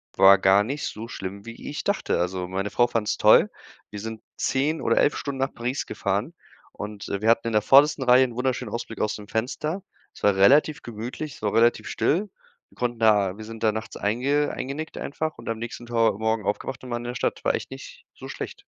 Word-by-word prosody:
war 95 +1 +8
gar 95 +1 +5
nicht 140 +7 -4
so 110 +2 -6
schlimm, 100 -2 -7
wie 115 0 -8
ich 145 - -5
dachte. 200 - 0
Also, 90 +1 -2
meine 95 +2 -2
Frau 120 +3 +3
fand's 115 -3 -1
toll. - - +6 0.4
Wir 105 - -7
sind 110 +1 -6 0.2
10 145 +4 0
oder 115 - +1
11 145 - +3
Stunden 140 -2 -4
nach 135 +1 -1
Paris 125 +4 -3
gefahren - - -2 0.4
und, 105 -1 -7
äh, 100 - -3
wir 110 - +2
hatten 115 0 +3
in 115 - -2
der 105 - +4
vordersten 140 +4 +5
Reihe 125 +1 +7
'n 120 -2 -7
wunderschönen 125 -2 -2
Ausblick 115 -1 -5
aus 105 - 0
dem 105 -1 -10
Fenster. 150 - -2 0.3
Es - - -16
war 100 -1 +4
relativ 145 +9 +5
gemütlich, 120 +6 -6
es - - -16
war 105 -1 -1
relativ 120 +1 +3
still. 195 +7 0 0.4
Wir - - -23
konnten 120 -2 -2
da 105 -4 +3
wir 110 - -8
sind 115 0 -9
da 110 - +4
nachts 110 0 -6
einge 135 +8 +1
eingenickt 145 +4 -5
einfach 155 +2 -4
und 115 - -7
am 115 - -2
nächsten 120 +1 -7
Ta 115 -1 +3
Morgen 110 -1 0
aufgewacht 120 +6 -3
und 125 - -8
waren 120 0 -2
in 120 - -5
der 125 - -5
Stadt - - -2
war - - +2
echt - - -6
nicht - - -10
so - - -10
schlecht. - - -7
115 Hz, 225 wpm, -25 LUFS, 105-130 Hz, 0.4 s, war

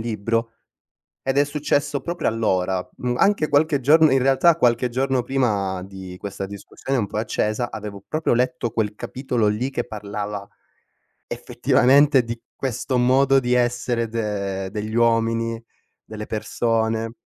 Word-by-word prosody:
libro, 115 +1 -2 0.7
ed 135 +1 -1
è - - +6
successo 145 -1 -1
proprio 170 +4 -3
allora, 95 -5 0
mhmm, 125 -1 -2
anche 195 -6 +2
qualche 145 0 +3
giorn 155 +3 +5
in 135 - +4
realtà 135 +5 +4
qualche 120 -2 +2
giorno 130 +1 0
prima 100 -9 0
di 95 -1 -9
questa 100 -1 -5
discussione 100 +6 -4
un 105 - -1
po' 105 - -5
accesa, 110 +1 -1
avevo 105 -2 -7
proprio 155 -4 0
letto 125 -1 0
quel 110 -2 -1
capitolo 125 0 -2
lì 115 +6 -1
che 120 -3 -2
parlava, 105 -1 -5 0.8
effettivamente, 135 +1 +3
di 115 0 -6
questo 130 0 -2
modo 135 +2 +4
di 125 -1 0
essere 120 -1 +1
de 100 -4 -3
degli 110 +2 -5
uomini, 115 0 +1 0.4
delle 105 0 -7
persone 115 +1 -1
115 Hz, 140 wpm, -22 LUFS, 105-130 Hz, 0.8 s, è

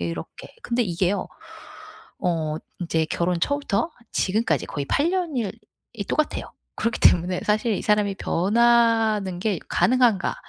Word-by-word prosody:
이렇게. 85 -1 -6
근데 245 0 0
이게요. 185 0 -1 0.9
어 160 -3 -1 0.2
인제 165 -2 0
결혼 170 +1 -1
초부터 285 - 0 0.2
지금까지 185 - 0
거의 145 - -4
8 290 - +1
년일 305 - -1 0.4
이 210 -4 -4
똑같아요. 305 +7 -1 0.2
그렇기 230 +1 -1
때문에 180 +1 +4
사실 215 +2 +1
'이 - - -3
사람이 210 -2 +2
변하는 220 -1 +2
게 195 -2 -1
가능한가. 245 -6 +2
205 Hz, 280 characters per minute, -24 LUFS, 175-235 Hz, 0.9 s, 때문에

